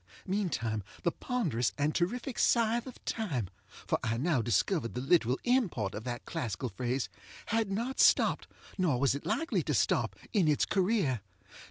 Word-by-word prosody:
Meantime 150 - -1 0.2
the 170 - +2
ponderous 150 - -1
and 150 +2 +1
terrific 240 +8 -1
Scythe 235 +1 +3
of 255 - -11
Time 140 - -2 0.4
(for - - 0
I 115 +1 0
now 145 -1 +1
discovered 120 - 0
the - - -1
literal 130 -2 +3
import 205 - +1
of 110 +3 -6
that 120 -1 -4
classical 120 +1 -3
phrase) 125 +2 -2 0.4
had 225 -2 +1
not 235 +7 -2
stopped, - - +4 0.3
nor 155 -9 +2
was 135 -1 +3
it 140 - -5
likely 325 +11 0
to - - -1
stop, - - +1 0.2
in 195 -7 +3
its 150 -2 +3
career. 185 - +1
155 Hz, 160 wpm, -31 LUFS, -, 0.4 s, stopped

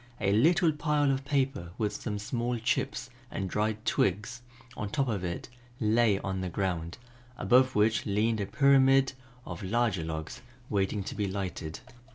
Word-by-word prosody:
A 100 - +1
little 165 - +4
pile 150 -1 +1
of 135 0 -1
paper 135 - -1
with 105 -2 -1
some 105 -3 -4
small 120 +3 -2
chips 130 +2 -1 0.2
and 95 - -3
dried 110 +3 -1
twigs 105 +6 0 0.3
on 105 - -4
top 135 +4 0
of 105 -6 -2
it 85 -1 -4 0.3
lay 110 -2 +3
on 95 -1 -3
the 95 - -3
ground, 85 -2 -2 0.4
above 130 +1 +4
which 110 +2 +2
leaned 105 +2 +1
a 100 - -2
pyramid 135 0 +4 0.3
of 85 -1 -7
larger 105 -3 0
logs, 80 -1 -5 0.3
waiting 100 0 0
to - - -5
be 105 -2 -1
lighted. 95 -5 -4
110 Hz, 160 wpm, -29 LUFS, 95-130 Hz, 0.4 s, little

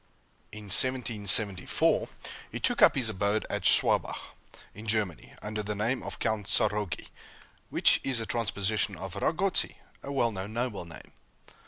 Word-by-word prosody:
In 105 0 -9
1774, 105 -4 +3 0.4
he - - -5
took - - 0
up - - +6
his 125 -5 +1
abode 105 +1 -1
at - - -2
Schwabach, - - +1 0.4
in 105 +3 -11
Germany, 105 -6 -1
under 105 0 -4
the 105 0 -4
name 115 +6 -1
of - - -7
Count 110 -3 -2
Tzarogy, 105 -5 0 0.6
which - - +3
is 130 -3 -1
a 115 - -4
transposition 105 -2 -1
of 95 0 -8
Ragotzy, 185 - 0 0.3
a 140 - -7
well 120 -4 +1
known 100 +1 -7
noble 120 -6 -3
name. 80 - -12
105 Hz, 145 wpm, -28 LUFS, 100-115 Hz, 0.6 s, up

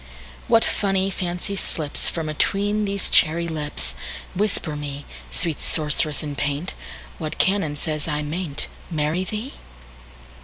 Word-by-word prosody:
What 225 - +5
funny 195 -1 +1
fancy 180 +2 -2
slipsFrom 160 -1 0
atween 205 +7 +1
these 200 -1 0
cherry 170 +1 +5
lips! 145 - -2 0.4
Whisper 190 -5 +1
me, 145 -1 -5 0.2
Sweet 165 -4 0
sorceress 150 -1 +2
in 145 -1 -4
paint, 145 +6 -1 0.5
What 155 -3 -3
canon 185 -6 +2
says 155 +1 -1
I 150 -1 0
may 165 +3 -2
n'tMarry 155 +4 -2
thee? 220 +6 -3
160 Hz, 120 wpm, -24 LUFS, 150-195 Hz, 0.5 s, What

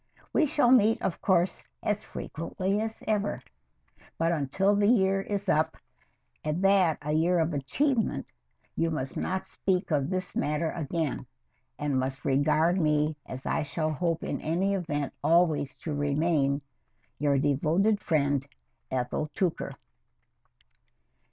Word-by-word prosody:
We 310 - +4
shall 260 -3 +3
meet, 225 -3 +5
of 180 - -2
course, 180 -1 +1
as 210 0 0
frequently 185 +5 -3
as 225 0 -5
ever, 210 -2 0 0.8
but 165 +1 +1
until 170 +6 +1
the 205 0 +3
year 195 -4 +3
is 200 0 -3
up, 160 -1 +2 0.7
and 155 +5 -1
that 195 -5 +4
a 150 - -2
year 170 +3 +3
of 165 0 +1
achievement, 225 - 0 0.4
you 165 - +1
must 135 -5 -3
not 190 0 -2
speak 185 -1 -1
of 145 -1 +1
the 185 -1 -2
matter 150 +2 0
again, 155 -4 -3 0.5
and 145 -3 0
must 135 +2 -3
regard 155 +6 +3
me 150 0 +2
as 130 0 -6
I - - 0
shall 155 +2 -2
hope 165 +2 -1
in - - -3
any 180 +6 0
event 150 -7 -2
always 160 -4 +3
to 155 - -5
remain, 145 -1 +1 0.6
Your 145 -2 +2
devoted 160 +9 +2
friend, 140 -4 +1 0.5
ETHEL 130 +4 -1
TOOKER. 180 -4 -1
165 Hz, 135 wpm, -28 LUFS, 145-190 Hz, 0.8 s, meet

